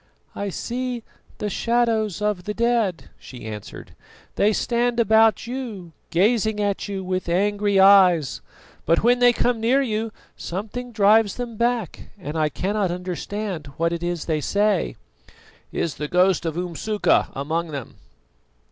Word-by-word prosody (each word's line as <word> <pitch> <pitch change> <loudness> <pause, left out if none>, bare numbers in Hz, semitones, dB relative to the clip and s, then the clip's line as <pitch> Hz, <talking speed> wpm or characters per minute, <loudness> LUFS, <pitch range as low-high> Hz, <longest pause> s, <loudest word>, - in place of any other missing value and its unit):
"I 200 - -3
see 245 +4 -4 0.3
the 210 - -3
shadows 220 -2 0
of 210 -4 -1
the 210 - -3
dead," 230 -6 0
she 125 -4 -11
answered; 105 -2 -8 0.4
"they 210 - +3
stand 240 +2 0
about 220 -1 +4
you, 230 -8 -6 0.2
gazing 215 +4 +2
at 205 0 -1
you 195 -2 -4
with 185 -1 -3
angry 200 +2 +1
eyes; 185 -6 +5 0.5
but 165 +4 +3
when 245 +1 +4
they 245 0 +6
come 240 0 0
near 240 +5 +3
you, 225 -4 -1 0.2
something 220 +7 -6
drives 215 -1 +4
them 240 -2 -5
back, 235 -5 -2
and 160 -5 -7
I 155 -1 +1
cannot 200 +3 -1
understand 180 0 -4
what 170 +1 +1
it 170 - -4
is 175 -2 -3
they 155 -2 -1
say." 200 +3 +1 0.8
"Is 165 - -2
the 150 - -5
ghost 180 0 +2
of 160 0 -3
Umsuka 180 +4 +1
among 160 +5 -2
them?" 140 -6 -7
205 Hz, 145 wpm, -23 LUFS, 175-225 Hz, 0.8 s, they